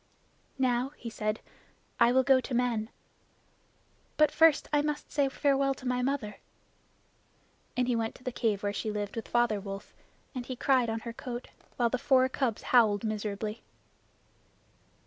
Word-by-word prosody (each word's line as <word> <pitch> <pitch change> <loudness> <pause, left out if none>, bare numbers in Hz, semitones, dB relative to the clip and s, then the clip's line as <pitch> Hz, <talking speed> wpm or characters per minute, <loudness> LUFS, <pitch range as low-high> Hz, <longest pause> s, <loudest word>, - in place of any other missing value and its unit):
"Now," 255 +1 +1
he 230 - -7
said, 215 0 -2 0.6
"I 235 0 +6
will 260 +1 +4
go 265 -1 +5
to 255 - -4
men. 235 -3 0 1.3
But 305 0 +5
first 320 -2 +4
I 295 - +4
must 295 0 -3
say 285 -2 +2
farewell 275 0 +1
to 255 - -8
my 250 0 +1
mother." 250 -6 -2 1.4
And 250 -1 +2
he 245 - +2
went 225 -1 -2
to - - -16
the 255 - -2
cave 215 -4 -1
where 205 0 0
she 215 +2 -3
lived 205 -1 -3
with 225 - -5
Father 240 -3 +2
Wolf, 195 0 -8 0.4
and 255 -3 -4
he 255 - -4
cried 255 -2 +2
on 225 0 -2
her 235 0 -6
coat, 245 +1 -6 0.3
while 235 -2 +2
the 255 - 0
four 260 -1 +4
cubs 255 -5 -1
howled 215 -4 +5
miserably. 215 0 -3
245 Hz, 165 wpm, -30 LUFS, 220-260 Hz, 1.4 s, I